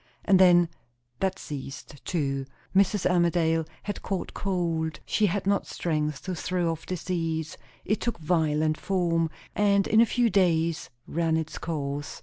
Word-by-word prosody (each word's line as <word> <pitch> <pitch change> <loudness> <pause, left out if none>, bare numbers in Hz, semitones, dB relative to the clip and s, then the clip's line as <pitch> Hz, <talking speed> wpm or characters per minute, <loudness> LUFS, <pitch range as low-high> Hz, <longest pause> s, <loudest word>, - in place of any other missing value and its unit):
And 190 -2 +5
then, 175 -2 +6 0.5
that 190 0 0
ceased 140 0 -8
too. 135 -5 -1 0.3
Mrs. 195 0 +3
Armadale 170 -2 +2 0.2
had 205 - -4
caught 190 -2 -3
cold, 170 -5 -1
she 215 - +2
had 195 +1 -1
not 200 0 +1
strength 150 -3 -2
to 185 - -3
throw 175 0 -1
off 165 -1 -7
disease; 165 -3 -2 0.3
it 210 - 0
took 235 - -1
violent 155 -2 +1
form, 170 -4 +1 0.3
and 200 -1 +3
in 220 +1 +5
a 235 - +5
few 240 -1 +2
days 170 -3 +2 0.2
ran 165 0 0
its 160 -1 -4
course. 145 -3 -4
170 Hz, 145 wpm, -27 LUFS, 160-190 Hz, 0.5 s, then